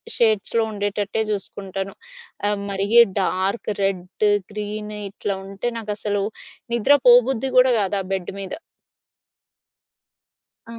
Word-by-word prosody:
షేడ్స్‌లో 225 0 +2
ఉండేటట్టే 205 +1 -2
చూసుకుంటాను. 195 -1 -4 0.5
ఆహ్, 205 0 +1
మరి 195 0 -1 0.3
డార్క్ 190 +5 -1
రెడ్, 190 +1 -1 0.3
గ్రీన్ 210 0 -5 0.2
ఇట్లా 200 0 -3
ఉంటే 195 +5 -3
నాకసలు 205 -1 -2 0.5
నిద్ర 250 +5 +5
పోబుద్ధి 250 +1 +5
కూడా 255 0 +7
గాదా 195 0 0
బెడ్ 190 -2 -3
మీద. 195 -1 -5 2.2
ఆ! 230 0 -8
205 Hz, 100 wpm, -22 LUFS, 195-220 Hz, 2.2 s, కూడా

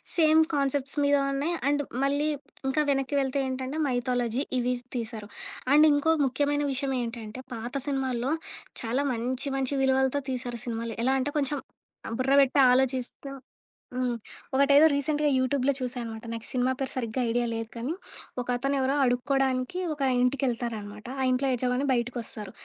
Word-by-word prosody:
Same 315 -1 +6
concepts 280 0 0
మీద 285 0 +4 0.2
ఉన్నాయి, 290 +5 0
and 290 0 +2 0.2
మళ్ళీ 285 +2 +1 0.4
ఇంకా 300 +3 +2
వెనక్కి 270 0 0
వెళ్తే 270 +1 0
ఏంటంటే 260 +3 -3
మైథాలజీ 245 0 0 0.2
ఇవి 250 +1 +1 0.2
తీశారు. 225 -3 -4 0.4
అండ్ 305 +1 +7
ఇంకో 290 +3 +3
ముఖ్యమైన 290 +2 +1
విషయమేంటంటే 250 -4 -3
పాత 235 +3 -6
సినిమాల్లో 265 -2 -1 0.5
చాలా 240 +5 0
మంచి 255 +4 -2
మంచి 270 +1 -1
విలువలతో 265 +1 +2
తీశారు 245 -2 -3
సినిమాలు. 230 -1 -3
ఎలా 260 +2 +3
అంటే 285 +3 -1
కొంచెం 285 +1 0 0.6
బుర్ర 265 +1 +2
బెట్టి 275 +1 +3
ఆలోచిస్తూ 260 +1 0 0.7
హ్మ్. 250 -1 0 0.4
ఒకటేదో 280 +3 +6
రీసెంట్‌గా 295 +1 +1
యూట్యూబ్‌లో 260 +1 +2
చూశాననమాట. 240 -3 -4
నాకు 230 0 -6
సినిమా 255 0 +1
పేరు 270 - -2
సరిగ్గా 245 0 -2
ఐడియా 240 +1 +1
లేదు 225 0 -3
కానీ, 240 +7 -2 0.5
ఒకతను 250 +3 -1
ఎవరో 265 +1 +1
అడుక్కోవడానికి 255 +4 +1
ఒక 295 - -11 0.2
ఇంటికెళ్తారనమాట 235 -5 -1 0.2
ఆ - - +2
ఇంట్లో 255 +2 +1
యజమాని 250 +2 0
బయటికొస్తారు. 235 -4 -2
260 Hz, 140 wpm, -27 LUFS, 245-280 Hz, 0.7 s, అండ్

